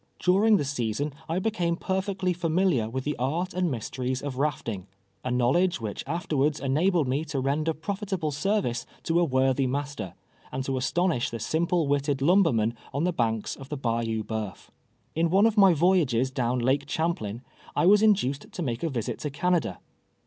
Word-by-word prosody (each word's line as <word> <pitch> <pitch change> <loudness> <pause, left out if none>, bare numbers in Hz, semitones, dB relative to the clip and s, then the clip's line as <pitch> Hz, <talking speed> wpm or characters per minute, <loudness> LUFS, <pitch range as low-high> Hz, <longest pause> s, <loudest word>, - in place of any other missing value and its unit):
During 205 +4 +4
the 145 - -1
season 135 +1 -2 0.2
I 165 - 0
be 220 +4 0
came 170 -4 0
perfectly 190 0 -1
familiar 165 - +1
with 130 +2 -3
the 150 +2 -2
art 165 +9 -1
and 180 -1 0
mysteries 130 +1 -3
of 135 -2 -4
rafting 115 -10 -2 0.2
— 95 0 -43
a 130 - -2
knowledge 130 +9 +2
which 110 -3 -4
afterwards 150 -2 0
enabled 155 +3 +2
me 135 +4 0
to 145 -3 -3
render 145 +4 0
profitable 190 0 -3
service 145 - -1 0.2
to 165 +1 +2
a - - +4
worthy 130 -2 +2
master, 140 -7 -4 0.4
and 130 - -3
to 135 - -1
astonish 160 +1 +1
the 115 - -5
simple 165 - 0
witted 140 0 +1
lumbermen 140 - +3 0.2
on 140 +3 -1
the 180 0 +1
banks 115 -6 -1
of 135 -1 -11
the 150 - -3
Bayou 115 -3 -1
Boeuf. 110 -2 -5 0.4
In 165 +1 +1
one 195 +5 +5
of 225 -2 +3
my 195 -3 +7
voyages 150 -7 +2
down 125 -2 0
Lake 135 +4 +1
Champlain, 130 -9 -2 0.3
I - - +2
was 205 +3 +6
induced 185 -11 +2
to 180 - -3
make 120 -4 -2
a 165 - 0
visit 120 -6 -3
to 150 - -3
Canada. 175 +5 0
145 Hz, 180 wpm, -27 LUFS, 125-175 Hz, 0.4 s, my